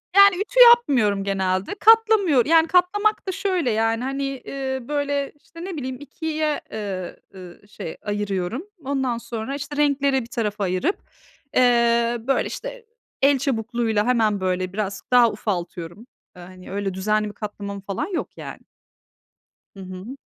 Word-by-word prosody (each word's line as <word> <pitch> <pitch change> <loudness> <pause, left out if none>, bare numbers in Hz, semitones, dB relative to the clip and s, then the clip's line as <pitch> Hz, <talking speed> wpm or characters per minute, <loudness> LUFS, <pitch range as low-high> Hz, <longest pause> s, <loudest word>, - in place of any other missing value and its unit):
Yani, 400 -1 +8
ütü - - -1
yapmıyorum 245 - +3
genelde. 190 - -1
Katlamıyor 435 - +5
yani, 325 +1 +5
katlamak 405 +5 +2
da 380 - 0
şöyle, 370 - 0
yani, 225 +2 0
hani, 275 +1 -2
eee, 270 0 -4
böyle 285 -1 -1
işte 335 +1 -11
ne 375 -4 -5
bileyim 260 -2 -4
2´ye, 305 +1 -3
eee, 195 -4 -5 0.2
ııı, 185 +2 -12
şey 165 -5 -8
ayırıyorum. 205 - -3 0.2
Ondan 265 -3 -1
sonra 235 +3 -5
işte 285 +1 -6
renkleri 280 -2 +2
bir 230 - -9
tarafa 215 -4 -2
ayırıp, 190 - 0 0.6
eee, 235 -1 +3
böyle 270 - +1
işte, - - -7 0.4
el 280 0 +5
çabukluğuyla 230 -4 0
hemen 220 -5 +2
böyle, 185 0 -1
biraz 200 -1 -3
daha 245 -2 +6
ufaltıyorum. 180 0 -5 0.3
Eee, 180 - -12
hani, 185 +1 -12
öyle 200 -1 -2
düzenli 210 +3 0
bir - - -10
katlamam 200 -1 -6
falan 195 - -3
yok, - - -4
yani. - - -8 1.2
Hı 195 - -12
hı. 185 +7 -8
240 Hz, 145 wpm, -23 LUFS, 200-290 Hz, 1.2 s, Yani